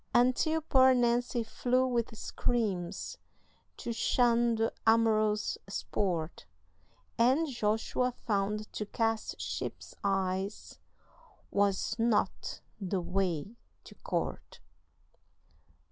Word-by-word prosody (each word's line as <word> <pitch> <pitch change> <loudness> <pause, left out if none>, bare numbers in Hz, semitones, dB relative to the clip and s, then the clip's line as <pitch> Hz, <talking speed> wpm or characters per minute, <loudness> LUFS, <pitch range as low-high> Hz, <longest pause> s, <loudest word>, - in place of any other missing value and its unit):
Until 255 +6 +3
poor 260 -4 +5
Nancy 240 0 +1
flew 250 +3 +1
with 235 -3 -1
screams, 205 -8 -2 0.6
To 235 - -4
shun 235 0 +3
the 225 +1 0
amorous 215 -2 +3
sport, 175 -4 -2 0.7
And 265 +8 +4
Joshua 240 0 0
found 210 -2 -2
to 210 - -4
cast 225 0 -1
sheep's - - -5
eyes 195 0 -2 0.7
Was 200 +2 +1
not 225 -2 0 0.2
the 195 -1 -1
way 180 +2 -1 0.3
to - - -13
court. - - -4
225 Hz, 90 wpm, -31 LUFS, 200-240 Hz, 0.7 s, poor